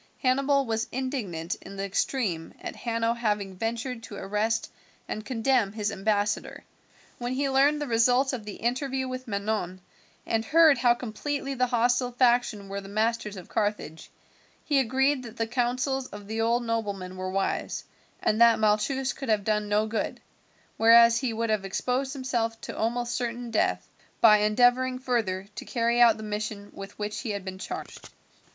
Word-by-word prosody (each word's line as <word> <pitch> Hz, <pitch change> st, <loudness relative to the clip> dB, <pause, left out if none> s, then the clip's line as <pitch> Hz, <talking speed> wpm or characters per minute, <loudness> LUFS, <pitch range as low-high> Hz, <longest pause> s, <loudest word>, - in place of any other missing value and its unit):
Hannibal 275 Hz, +2 st, +3 dB
was 225 Hz, -1 st, -1 dB
indignant 220 Hz, -, -3 dB
in 195 Hz, -, -10 dB
the 195 Hz, -, -2 dB
extreme 195 Hz, -4 st, -2 dB
at -, -, -6 dB
Hanno 230 Hz, -1 st, -1 dB
having 210 Hz, -5 st, -2 dB
ventured 230 Hz, +4 st, -3 dB
to 215 Hz, -, -9 dB
arrest 210 Hz, +3 st, -1 dB, 0.4 s
and 215 Hz, -, -4 dB
condemn 235 Hz, -3 st, +1 dB
his 210 Hz, -1 st, -2 dB
ambassador. 205 Hz, +1 st, -1 dB, 0.6 s
When 245 Hz, +1 st, -2 dB
he 275 Hz, +2 st, 0 dB
learned 280 Hz, +3 st, +4 dB
the 295 Hz, -, -2 dB
result 245 Hz, +3 st, +3 dB
of 240 Hz, -4 st, -4 dB
the 210 Hz, -1 st, -7 dB
interview 260 Hz, +2 st, -1 dB
with 255 Hz, 0 st, -6 dB
Manon, 200 Hz, -3 st, -2 dB, 0.5 s
and 225 Hz, 0 st, 0 dB
heard 310 Hz, +1 st, +5 dB
how 240 Hz, -1 st, +4 dB
completely 275 Hz, +4 st, -4 dB
the 255 Hz, -1 st, +1 dB
hostile 245 Hz, +1 st, +2 dB
faction 240 Hz, -5 st, +2 dB
were 200 Hz, +1 st, -4 dB
the 195 Hz, -, -11 dB
masters 215 Hz, 0 st, -1 dB
of 180 Hz, -, -9 dB
Carthage, 205 Hz, -7 st, -2 dB, 0.6 s
he 285 Hz, -3 st, +3 dB
agreed 265 Hz, +2 st, +2 dB
that 235 Hz, -2 st, -10 dB
the 225 Hz, -, 0 dB
counsels 250 Hz, +3 st, -1 dB
of 205 Hz, 0 st, -10 dB
the 220 Hz, +2 st, -3 dB
old 235 Hz, +2 st, +2 dB
nobleman 200 Hz, -5 st, -3 dB
were 185 Hz, 0 st, -4 dB
wise, 195 Hz, +1 st, -2 dB, 0.4 s
and 215 Hz, +2 st, +2 dB
that 235 Hz, -1 st, +7 dB
Malchus 220 Hz, +6 st, +1 dB
could 270 Hz, -3 st, -7 dB
have 215 Hz, -2 st, +2 dB
done 210 Hz, 0 st, 0 dB
no 210 Hz, +1 st, +2 dB
good, 220 Hz, +1 st, -3 dB, 0.6 s
whereas 230 Hz, 0 st, +7 dB
he 255 Hz, -3 st, -1 dB
would 225 Hz, 0 st, -1 dB
have 215 Hz, -2 st, 0 dB
exposed 250 Hz, +7 st, -1 dB
himself 240 Hz, -4 st, -2 dB
to -, -, -7 dB
almost 240 Hz, +2 st, -1 dB
certain 240 Hz, -1 st, -3 dB
death, 220 Hz, -, 0 dB, 0.3 s
by 215 Hz, -2 st, +7 dB
endeavouring 245 Hz, +4 st, +3 dB
further 225 Hz, -7 st, -1 dB
to -, -, -7 dB
carry 235 Hz, -1 st, +1 dB
out 235 Hz, -2 st, +6 dB
the 220 Hz, -, -8 dB
mission 210 Hz, -1 st, -4 dB
with 195 Hz, 0 st, -9 dB
which 210 Hz, 0 st, -3 dB
he 245 Hz, -, -5 dB
had 200 Hz, -2 st, -4 dB
been 190 Hz, 0 st, -6 dB
charged. -, -, -7 dB
230 Hz, 170 wpm, -27 LUFS, 210-255 Hz, 0.6 s, that